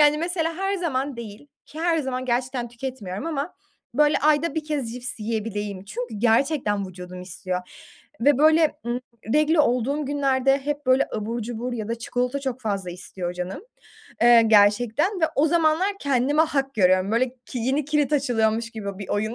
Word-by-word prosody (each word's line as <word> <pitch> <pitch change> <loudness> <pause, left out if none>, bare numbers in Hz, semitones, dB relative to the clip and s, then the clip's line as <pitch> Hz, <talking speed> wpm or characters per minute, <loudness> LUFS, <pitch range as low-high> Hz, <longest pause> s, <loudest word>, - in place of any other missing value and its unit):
Yani 295 0 +5
mesela 335 -1 -1
her 390 +1 -1
zaman 280 -7 -2
değil 225 +3 -9 0.2
ki 315 - -9
her 335 -1 +2
zaman 260 -3 -2
gerçekten 245 0 -1
tüketmiyorum 235 - -6
ama 305 0 -3 0.4
böyle 300 +2 +4
ayda 305 +3 +2
1 315 - -2
kez 285 -7 -3
cips 245 -2 -4
yiyebileyim 210 -3 -3
çünkü 240 +3 -5
gerçekten 225 -3 +2
vücudum 180 0 -9
istiyor 180 0 -4 0.6
ve 285 +1 +4
böyle, 315 +1 +5
ııı, 240 +1 -1 0.3
regl 305 +2 +4
olduğum 275 +1 +1
günlerde 275 -1 +2
hep 290 0 -4
böyle 260 +1 +4
abur 225 +2 -3
cubur 240 +2 -4
ya 220 -3 -4
da 230 - 0
çikolata 250 +4 -2
çok 260 -2 -4
fazla 200 -5 -2
istiyor 180 0 -5
canım, 180 - -5 0.6
eee, 235 -1 +8
gerçekten 225 - +3
ve - - +4
o 295 +3 +4
zamanlar 325 +3 +3
kendime 280 +3 +2
hak 275 -4 -1
görüyorum. 185 0 +3
Böyle 250 +2 +2 0.2
ki 250 - -5
yeni 265 +5 0
kilit 300 -1 0
açılıyormuş 230 -5 +1
gibi 200 -3 -6
bir 200 - -7
oyun, 215 +3 -1
250 Hz, 165 wpm, -24 LUFS, 220-295 Hz, 0.6 s, eee